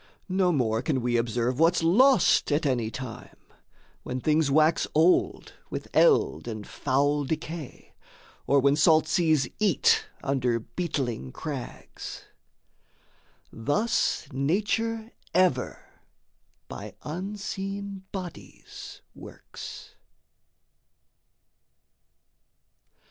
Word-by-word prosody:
No 185 -1 +2
more 115 -7 +1
Can 135 -4 -1
we 120 -1 0
observe 120 +2 0
what's 165 +1 +3
lost 245 - +4
at 150 +2 +1
any 120 -5 0
time, 120 0 -8 0.6
When 125 - -4
things 155 +2 +2
wax 155 +3 +3
old 165 +4 +2 0.2
with - - -5
eld 460 - +3
and 110 -3 -5
foul 145 +2 0
decay, 155 0 -6 0.5
Or 140 - +4
when 140 +1 +3
salt 155 +1 +4
seas 155 -5 +2
eat 445 - +3 0.2
under 125 -4 0
beetling 125 - -3
crags. 145 -5 -7 1.3
Thus 145 - 0
Nature 215 - -1 0.2
ever 180 -9 +1 0.8
by - - -8
unseen 195 +2 -5
bodies 185 -3 -9
works. - - -10
155 Hz, 90 wpm, -27 LUFS, 130-185 Hz, 1.3 s, lost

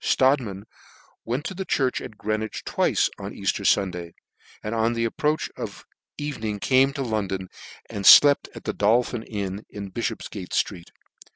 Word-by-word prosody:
.Strodtman 125 -8 +2 0.6
went 125 +7 -2
to - - -3
the 190 +1 -4
church 135 -8 0
at 110 - -9
Greenwich 110 +1 -3
twice - - +2
on - - -6
Easier - - -1
Sunday, 90 -4 +1 0.5
and 105 - -3
on 115 +1 +1
the 115 0 0
approach 150 +7 0
of - - -7 0.3
evening 110 -8 -3
came 130 +5 +3
to 140 -2 -3
London, 100 -5 -2 0.4
and 100 - -5
flept 145 -1 +8
at - - -9
the - - -2
Dol 110 +4 +3
phin 120 -1 -5
inn, 100 -2 -5
in 100 -2 -7
Bifhopfgate 110 -4 -4
ftreet. 90 -4 -1
110 Hz, 160 wpm, -24 LUFS, 100-130 Hz, 0.6 s, flept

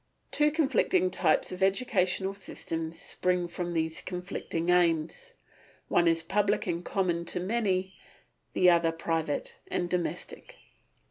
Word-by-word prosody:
Two 300 0 +3
conflicting 335 +4 +2
types - - +2
of 185 +1 -6
educational 190 -2 +1
systems 165 -4 -5
spring 180 -1 0
from 175 0 -4
these 160 -1 -1
conflicting 180 -2 -4
aims. 175 - +1 0.6
One 175 - +3
is 165 0 +3
public 205 +3 +1
and 175 -1 -2
common 175 -3 0
to 180 - -2
many, 190 -2 0 0.6
the 180 - +4
other 170 -1 +3
private 165 - -2
and 180 - -1
domestic. 175 -1 -4
180 Hz, 125 wpm, -29 LUFS, 170-200 Hz, 0.6 s, the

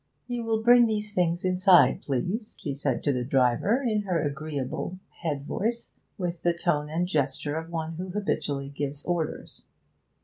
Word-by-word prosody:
'You 245 -1 -3
will 220 -1 0
bring 240 0 +7
these 210 -1 -2
things 175 -1 +1
inside, 180 -6 +5
please,' 185 - -3
she 145 - -3
said 135 -2 -1
to 145 - +2
the 125 -1 -1
driver, 135 - +2
in 215 -2 +1
her 185 -4 0
agreeable 145 +3 -3 0.2
head 145 -4 -2
voice, 230 +8 -2 0.2
with 175 -2 -3
the 175 - +2
tone 150 -3 0
and 170 +3 0
gesture 145 -2 0
of 160 +1 -4
one 165 -1 -3
who 185 +1 -5
habitually 150 -8 -2
gives 140 0 -4
orders. 175 -3 -3
170 Hz, 165 wpm, -27 LUFS, 145-195 Hz, 0.2 s, bring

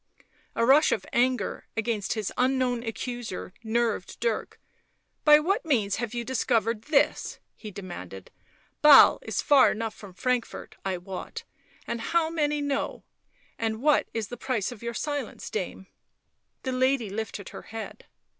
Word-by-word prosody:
A 230 - +2
rush 285 +5 +6
of - - -1
anger 250 +1 0
against 220 -3 -1
his 215 -4 -3
unknown 255 -1 +1
accuser 235 -4 -5
nerved 225 -3 -1
Dirk. 230 -2 -2 0.6
"By 300 -1 +8
what 390 +9 0
means 220 -11 +1
have 235 0 -4
you 240 - -2
discovered 230 -3 0
this!" 295 -2 +1 0.2
he 215 - -9
demanded. 175 - -9 0.3
" - - -37
Basle 300 -2 +9
is - - -2
far 280 -3 +6
enough 225 0 -3
from 195 -4 -13
Frankfort, 250 +3 -2
I 190 -1 -1
wot... 185 +1 -7 0.4
and 235 - -3
how 325 +5 +1
many 295 -2 0
know... 285 -1 -2 0.6
and 220 -1 -1
what 295 +4 +3
is 225 -3 -3
the 245 - -6
price 245 -5 -1
of 240 - -10
your 235 0 -4
silence, 290 -4 -4
dame 190 -2 -4 0.4
?" - - -49
The 260 - -2
lady 255 -4 +1
lifted 205 -2 -5
her - - -9
head. 225 0 -8
235 Hz, 155 wpm, -27 LUFS, 215-265 Hz, 0.6 s, Basle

